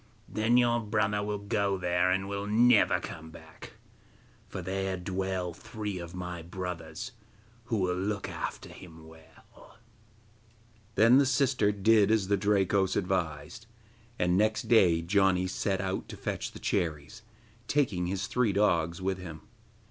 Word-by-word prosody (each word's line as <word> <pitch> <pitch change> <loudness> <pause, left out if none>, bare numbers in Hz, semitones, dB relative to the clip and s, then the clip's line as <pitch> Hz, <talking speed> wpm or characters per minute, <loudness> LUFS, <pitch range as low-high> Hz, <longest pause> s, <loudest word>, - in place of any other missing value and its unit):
Then 110 +3 +2
your 120 -1 +3
brother 105 -1 0
will 105 0 -2
go 100 -1 -1
there, 90 0 +1
and 95 +1 0
will 100 0 -4
never 115 +2 +4
come 80 0 -8
back, - - -13 0.8
for - - -6
there 95 +1 -2
dwell 95 -1 -3
three 105 +1 -6
of 85 +1 -8
my 90 -1 -5
brothers 90 +3 -6 0.5
who 115 -2 -1
will 90 -2 0
look 100 +2 -2
after - - -5
him 80 -3 -13
well.' 80 0 -18 1.2
Then 115 +5 +6
the 140 - +4
sister 130 -5 +2
did 105 0 +4
as 110 -4 +1
the 100 - +4
Drakos 100 -1 +1
advised, 90 +1 -2 0.5
and 90 0 +2
next 110 +2 +2
day 90 -8 +4
Janni 95 0 +2
set 95 +2 -1
out 95 0 -3
to - - -8
fetch - - -4
the - - -9
cherries, 80 +6 -2 0.5
taking 105 -12 +1
his 95 +1 -2
three 115 -2 +1
dogs 85 -3 +1
with 95 0 -1
him. 80 -4 -8
95 Hz, 145 wpm, -29 LUFS, 90-105 Hz, 1.2 s, Then